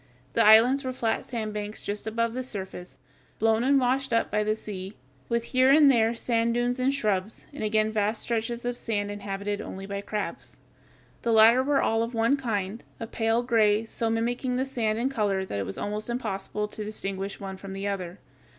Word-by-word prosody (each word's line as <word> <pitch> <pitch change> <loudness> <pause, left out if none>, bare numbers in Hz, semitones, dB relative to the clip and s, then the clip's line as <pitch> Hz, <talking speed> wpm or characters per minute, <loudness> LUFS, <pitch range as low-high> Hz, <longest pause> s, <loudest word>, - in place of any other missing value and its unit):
The 230 - +4
islands 230 +6 +6
were 260 -1 -3
flat 230 -3 -1
sand 220 -4 -4
banks 210 0 -5
just 205 +1 -4
above 230 +1 0
the 255 - -2
surface, 190 -7 -7 0.4
blown 225 +1 +2
and 275 +1 +4
washed 265 +1 0
up 230 - +1
by 210 +1 +1
the 215 0 +1
sea, 200 -2 -7 0.3
with 235 0 +1
here 255 +2 +3
and 285 0 +7
there 230 -2 +3
sand 230 0 0
dunes 245 +1 0
and 255 +2 +2
shrubs, 215 -6 -1
and 285 - -5
again 215 0 +1
vast 215 0 0
stretches 235 +1 -2
of 245 0 -2
sand 205 -3 -2
inhabited 205 0 -4
only 195 +1 -7
by 200 0 -4
crabs. 210 +1 -5 0.6
The 235 - 0
latter 225 +3 +7
were 275 +1 +2
all 225 0 +2
of 230 +1 -3
one 230 +4 +3
kind, 220 -5 -3 0.2
a 230 - -4
pale 225 +1 0
gray, 220 -3 +3
so 225 0 -2
mimicking 240 +3 -1
the 260 +1 0
sand 225 -5 -1
in 240 +3 +1
color 205 -7 0
that 100 - -4
it 100 - -3
was 95 - -5
almost 210 +2 -4
impossible 210 -3 -3
to 215 - -4
distinguish 195 -2 -4
one 195 -1 -6
from 195 0 -8
the 195 +1 -4
other. 185 -2 -4
220 Hz, 200 wpm, -27 LUFS, 205-240 Hz, 0.6 s, and